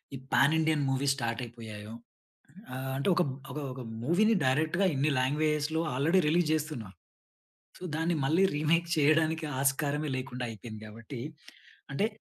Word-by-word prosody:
ఈ - - -4 0.2
pan 145 +3 +5
Indian 155 -2 +2
movies 135 +1 +2
start 115 0 -2
అయిపోయాయో. 110 -2 -9 0.8
ఆహ్, 130 +1 -4
అంటే 140 - -1
ఒక, 180 - +3 0.3
ఒక, 145 - -5
ఒక 130 - -8 0.2
మూవీని 215 - +4
డైరెక్ట్‌గా 155 +8 +2
ఇన్ని 140 +3 +2
లాంగ్వేజ్‌లో 150 +3 +1
ఆల్రెడీ 160 +8 +3
రిలీజ్ 165 0 +3
జేస్తున్నాం. 150 -10 -2 0.9
సో, - - -16
దాన్ని 165 +1 +1
మళ్ళీ 165 +6 +4
రీమేక్ 165 +3 +2
చేయడానికి 155 +1 +3
ఆస్కారమే 145 +2 +1
లేకుండా 125 -1 -4
అయిపోయింది. 110 0 -9
కాబట్టి, 115 +4 -8 0.7
అంటే, 200 +10 +1
145 Hz, 140 wpm, -30 LUFS, 130-160 Hz, 0.9 s, pan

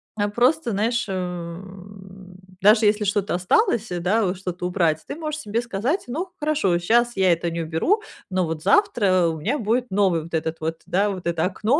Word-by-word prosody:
а, 205 -1 0
просто, 245 +5 +2
знаешь, 225 +4 0
м, 185 +1 -7 0.2
даже 215 +3 +5
если 210 0 +3
что-то 200 -2 0
осталось, 220 - +1
э, 175 - -2
да, 200 +6 +1
вот 180 0 -2
что-то 180 -1 -5
убрать, 170 -4 +1
ты - - -5
можешь 305 -1 -4
себе 225 -2 -1
сказать: 240 - -2
"Ну 325 +10 -4
хорошо, 295 - +1
щас 235 +5 +2
я 190 -1 +4
это 170 0 -2
не 170 0 -3
уберу, 165 - 0 0.3
но 185 -1 0
вот 160 -1 -5
завтра 200 - +3
у 160 -1 -3
меня 245 - -1
будет 235 +1 0
новый 190 -5 +2
вот 165 - -13
этот 160 0 -2
вот, 160 +1 -3
да, 200 +3 +1
вот 185 -3 -5
это 170 -2 0
окно, 215 - +1
195 Hz, 195 wpm, -23 LUFS, 175-235 Hz, 0.3 s, даже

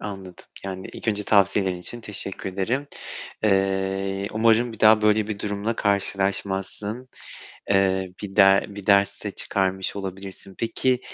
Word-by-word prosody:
Anladım. 95 -3 -8 0.2
Yani 95 -1 -5
ilk - - -6
önce 105 -1 +1
tavsiyelerin 100 -2 +3
için 120 +7 -5
teşekkür 100 -3 -4
ederim. 115 +10 -1 0.6
Eee, 95 0 0
umarım 115 +2 +3
bir 110 - -12
daha 110 0 +6
böyle 105 0 +3
bir 105 - -3
durumla 105 +3 -2
karşılaşmazsın. 100 +3 -1 0.6
Eee, 95 -1 +2
bir 95 -2 -7
de 95 -1 +6
bir 100 -1 -9
ders 100 0 +3
de - - -2
çıkarmış 95 0 -1
olabilirsin. 95 0 -7
Peki, 125 +2 0
100 Hz, 135 wpm, -24 LUFS, 95-105 Hz, 0.6 s, daha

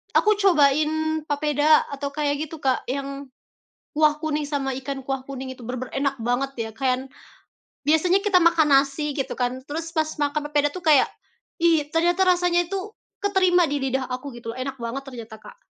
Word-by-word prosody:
aku 425 - +5
cobain 315 -2 +3
papeda 295 +1 +3
atau 280 0 -3
kayak 290 +1 -2
gitu, 320 - -9
Kak, 265 -3 -1
yang 275 +1 -4 0.7
kuah 305 0 +3
kuning 300 -1 -1
sama 275 -3 -2
ikan 270 0 -5
kuah 265 0 -4
kuning 265 -1 -6
itu 240 - -12
bener-bener 255 +1 -5
enak 275 0 0
banget 245 +4 0 0.2
ya - - -11
kan. 260 0 -1 0.8
Biasanya 345 +5 +4
kita 370 -4 +4
makan 330 -2 +4
nasi 275 +1 +1
gitu 270 - -4
kan 250 +1 -1
terus 325 +4 -6
pas 315 -1 +1
makan 290 0 0
papeda 290 0 +2
tuh 365 - -7
kayak, 300 -4 +5 0.6
"Ih, 325 -4 +4
ternyata 350 +3 +3
rasanya 350 -1 +3
itu 390 +2 -4 0.3
keterima 370 -3 +3
di 290 - 0
lidah 265 -1 -2
aku," 255 +1 -5
gitu, 230 -1 -7
enak 265 +1 -4
banget 240 +4 -4
ternyata, 230 -4 -9
Kak. 480 - -14
290 Hz, 170 wpm, -24 LUFS, 270-315 Hz, 0.8 s, aku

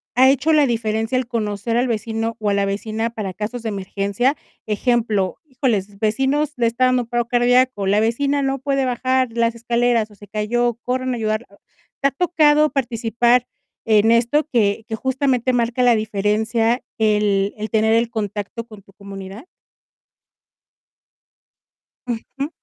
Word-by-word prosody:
ha 260 +1 +6
hecho 280 +4 +2
la 295 -2 +4
diferencia 225 0 -1
el 255 -2 -2
conocer 220 -1 -2
al 245 +2 +2
vecino 225 0 -2
o 210 - -1
a - - +1
la 200 0 +1
vecina 215 +3 -2
para 205 -5 -5
casos 220 +5 -5
de 220 - -2
emergencia? 200 +6 -1 0.3
Ejemplo: 215 -3 0
"Híjoles, 220 -8 -2
vecinos, 270 +7 0
le 235 -1 +2
está 245 +3 +1
dando 255 -1 +2
un - - -15
paro 240 -1 -1
cardíaco, 245 -3 +2
la 205 +2 +3
vecina 280 +6 +1
no 270 0 -1
puede 275 0 0
bajar 255 +1 +1
las 230 0 +1
escaleras, 235 -1 +1
o 210 - -16
se 205 +1 -14
cayó, 230 +3 0
corran 255 +1 -1
a 240 - -3
ayudarla". 215 +1 -2 0.5
¿Te 275 - +4
ha - - -17
tocado 305 -2 +3
participar 240 -1 +1 0.4
en 220 0 +4
esto, 240 +6 +2
que 215 -2 +1
que 220 - -3
justamente 260 0 0
marca 245 +1 0
la 245 -1 +5
diferencia 220 +3 0 0.2
el 210 -2 +1
el 215 +1 -4
tener 220 0 +2
el 230 0 +2
contacto 215 0 -4
con 215 -3 -13
tu 195 - -22
comunidad? 200 - -9 2.6
Ujú. 260 +4 -4
230 Hz, 155 wpm, -20 LUFS, 215-255 Hz, 2.6 s, ha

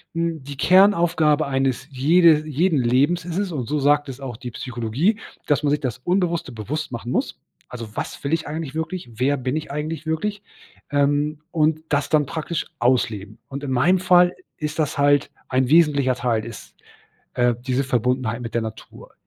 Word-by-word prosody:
hm, 165 -2 -1
die 140 +1 -9
Kernaufgabe 170 -4 +4
eines 135 -1 -1
jede 155 +3 +4
jeden 155 +1 +1
Lebens 135 +8 +2
ist 175 +1 -4
es 200 -2 -1
und 130 -8 -4
so 150 - -1
sagt 145 +1 +2
es 135 0 -7
auch 135 -4 -6
die 125 +2 -7
Psychologie, 125 - -1 0.3
dass 145 -2 +2
man 150 - +1
sich 150 +1 +1
das 125 -4 -3
Unbewusste 175 -1 0
bewusst 130 +7 -4
machen 120 0 -5
muss. - - -2 0.3
Also, 115 -3 -7
was - - -5
will 140 +2 -1
ich 165 - 0
eigentlich 155 -2 -5
wirklich? 160 -3 -4
Wer 135 +5 +1
bin 130 +2 -2
ich 155 - -4
eigentlich 155 +2 -4
wirklich? 205 +6 -2 0.5
Ähm. 145 +1 +1
Und 155 0 +1
das 145 -1 0
dann 150 -2 +3
praktisch 160 +2 -3
ausleben. 110 -4 0
Und 140 +1 -7
in 140 - -4
meinem 150 +9 +3
Fall 180 -1 +4 0.2
ist 150 +1 -4
das 150 -1 0
halt 145 0 +3 0.2
ein 130 0 +2
wesentlicher 145 -5 +4
Teil 115 -3 -1
ist, 115 -2 -10 0.6
äh, 120 -1 +2
diese 130 +2 -1
Verbundenheit 125 -2 0
mit 115 -2 -6
der 115 - +1
Natur. 110 0 -9
145 Hz, 180 wpm, -22 LUFS, 125-160 Hz, 0.6 s, Kernaufgabe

